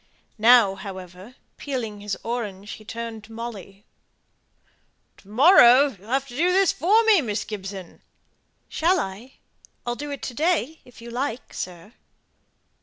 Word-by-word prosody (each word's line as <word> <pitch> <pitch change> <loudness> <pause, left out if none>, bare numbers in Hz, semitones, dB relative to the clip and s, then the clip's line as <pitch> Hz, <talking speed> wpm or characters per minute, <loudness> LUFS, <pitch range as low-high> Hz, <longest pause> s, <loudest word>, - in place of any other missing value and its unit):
Now, 225 -3 +6
however, 190 +3 -10 0.2
peeling 230 -7 -5
his 205 -2 -4
orange, 210 -4 -5
he 215 - -9
turned 225 0 -7
to 225 - -17
Molly 210 -4 -8 1.3
"To - - -21
morrow 260 - +6
you'll 205 +4 -16
have 270 +2 0
to 240 - -10
do 345 +6 +2
this 380 -1 +4
for 405 - +3
me, 435 -6 +5
Miss 210 -5 -3
Gibson." 195 -3 -8 0.7
"Shall 350 +3 +1
I? 205 +7 -6 0.5
I'll 240 - -1
do 290 +4 -6
it 280 - -6
to 250 - -4
day, 320 0 0
if 245 -2 -16
you 235 - -9
like, 250 0 -4
sir." 180 +4 -7
235 Hz, 145 wpm, -24 LUFS, 205-275 Hz, 1.3 s, Now